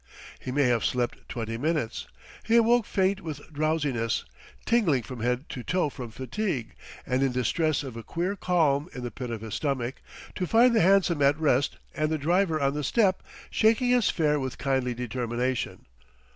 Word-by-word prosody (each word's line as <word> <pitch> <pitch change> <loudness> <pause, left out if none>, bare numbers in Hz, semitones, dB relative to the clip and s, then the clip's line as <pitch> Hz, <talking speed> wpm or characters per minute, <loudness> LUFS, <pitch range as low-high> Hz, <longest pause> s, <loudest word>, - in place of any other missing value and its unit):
He 130 - -5
may 145 +2 +2
have 120 -3 +2
slept 125 -1 -2
twenty 115 -1 -4
minutes; 150 -5 -1 0.3
he 225 - +1
awoke 235 0 +4
faint 195 0 +1
with 155 -2 -8
drowsiness, 145 -7 0 0.4
tingling 180 - +2
from 130 0 -8
head 125 +5 -1
to 125 - -5
toe 165 +4 0
from 125 -3 -7
fatigue, 130 - -3 0.3
and 130 +1 0
in 135 -1 +2
distress 145 +5 0
of 130 -4 -7
a 115 - -6
queer 175 - -2
qualm 165 -5 +1
in 125 - -6
the 120 - -4
pit 125 +2 -6
of 115 -2 -4
his 110 -2 -7
stomach, 135 -4 -2 0.3
to 180 - -3
find 235 +3 +5
the 220 - +4
hansom 185 -4 +3
at 140 +2 +4
rest 140 -3 +2 0.2
and 155 0 0
the 160 - 0
driver 165 +2 +1
on 140 -1 +1
the 150 0 -3
step, 190 - +2 0.3
shaking 230 +3 +3
his 245 -3 +3
fare 150 -3 +1
with 130 -2 -4
kindly 130 -2 0
determination. 125 +1 -2
145 Hz, 180 wpm, -27 LUFS, 125-180 Hz, 0.4 s, find